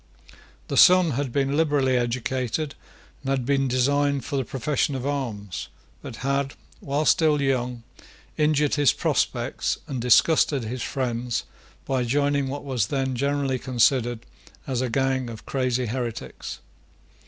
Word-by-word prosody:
The - - -2
son 180 -2 +7
had 135 0 -2
been 140 +2 0
liberally 145 -4 +2
educated, 125 +3 -1 0.5
and 135 - -5
had 135 -2 0
been 135 0 +2
designed 140 +2 +1
for 145 - -4
the 135 - +1
profession 135 +3 -1
of 130 0 -4
arms, 110 - -3 0.3
but - - -8
had, 140 0 0 0.2
while 145 +2 -1
still 155 -2 +4
young, 125 -3 -1 0.5
injured 150 -1 +2
his 145 -2 +4
prospects - - -1
and 130 -3 -4
disgusted 135 +2 +4
his 120 +3 -4
friends 120 -2 -2 0.4
by 130 -2 0
joining 140 +2 +1
what 140 +2 -5
was 125 -8 -1
then 135 -1 -1
generally 140 0 0
considered 120 -1 +1 0.4
as 130 -2 -1
a 130 - -1
gang 130 0 0
of 110 -2 -9
crazy 130 -2 0
heretics. 120 0 -5
135 Hz, 140 wpm, -24 LUFS, 125-140 Hz, 0.5 s, son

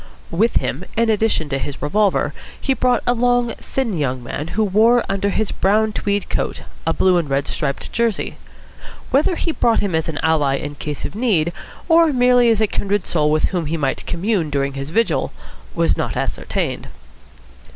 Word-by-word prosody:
With 215 +8 +1
him, - - -1
in 230 -1 +3
addition 215 -7 +1
to 135 -1 -1
his 140 0 -5
revolver, 200 +7 +1 0.3
he 270 - +1
brought 250 -1 +1
a 245 - +3
long, 245 -1 +1
thin 250 -7 -2
young 130 -3 -1
man 145 +5 -5
who 220 - +3
wore 225 +4 +4
under 200 +1 0
his 215 +1 -1
brown 215 +3 +2
tweed 205 -1 -1
coat - - -2 0.2
a - - +4
blue 185 +1 +3
and 155 -4 -4
red 135 0 0
striped 140 - -3
jersey. 230 -3 -1 0.7
Whether 295 +6 +3
he 330 - -1
brought 235 -7 +2
him 200 -4 -1
as 160 0 0
an 155 - -5
ally 150 -4 +2
in 145 +1 -5
case 145 0 -5
of - - -6
need 195 -8 +1 0.3
or 330 -2 +5
merely 245 -2 +4
as 220 -1 +3
a - - +5
kindred 205 -1 -1
soul 150 -3 +1
with 155 0 +2
whom 175 -5 -2
he 165 +2 -1
might 140 -3 -2
commune 175 -2 0
during 140 -1 -1
his 135 +1 -5
vigil, 225 +7 0 0.4
was - - +2
not - - -3
ascertained. - - -2
200 Hz, 185 wpm, -20 LUFS, 155-230 Hz, 0.7 s, or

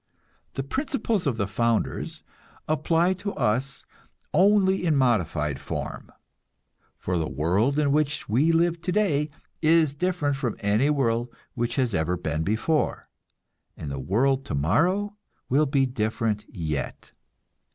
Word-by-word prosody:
The 135 - -2
"principles 230 - -1
of 125 -5 0
the 100 - 0
founders" 115 +3 -1 0.4
apply 165 +3 +2
to 200 0 -3
us 130 +5 -1 0.5
only 190 +1 +4
in 160 -4 +2
modified 85 - +1
form; - - -6 0.9
for 90 -1 -2
the 80 - -2
world 95 - +1
in 145 -2 +2
which 150 0 0
we 135 +10 +3
live 170 0 +2
today 180 -6 +1 0.3
is 160 -2 +4
different 150 -3 -1
from 125 -5 -2
any 105 +8 +2
world 120 -4 +1 0.2
which 120 -1 -2
has 125 -5 +1
ever 90 +1 0
been 80 -2 -2
before, 110 - 0 0.7
and 75 - -6
the 70 - -4
world 130 - +1
tomorrow 175 - +1 0.3
will 145 +4 +3
be 135 -1 +2
different 110 -3 -1
yet. 80 -7 -4
135 Hz, 130 wpm, -25 LUFS, 105-160 Hz, 0.9 s, only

